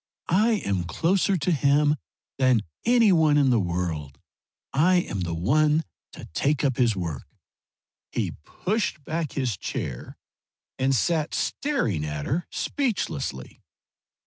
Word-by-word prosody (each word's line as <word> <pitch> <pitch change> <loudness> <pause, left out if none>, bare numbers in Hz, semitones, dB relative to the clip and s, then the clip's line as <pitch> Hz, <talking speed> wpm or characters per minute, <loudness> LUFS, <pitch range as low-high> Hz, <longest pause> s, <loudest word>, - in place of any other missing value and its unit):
I 215 +6 +4
am 95 -3 0
closer 185 - +1
to 175 +3 0
him 145 0 +3 0.4
than 130 -4 +4 0.2
any 235 -3 +5
one 155 -4 +4
in 140 -3 +4
the 120 - +4
world! 85 -6 -3 0.6
I 170 +7 +4
am 175 - 0
the 85 -2 -2
one 150 - +2 0.3
to - - -9
take 145 - +1
up 130 -4 +1
his 120 -4 +3
work!" 85 -8 -4 0.8
He - - -1
pushed 190 - -2
back 160 -1 -3
his 130 -7 -1
chair 60 -6 -5 0.6
and 135 +1 +2
sat 155 +5 0
staring 120 - -1
at 75 -1 -4
her 170 +5 -1
speechlessly. 130 - -3
140 Hz, 130 wpm, -25 LUFS, -, 0.8 s, any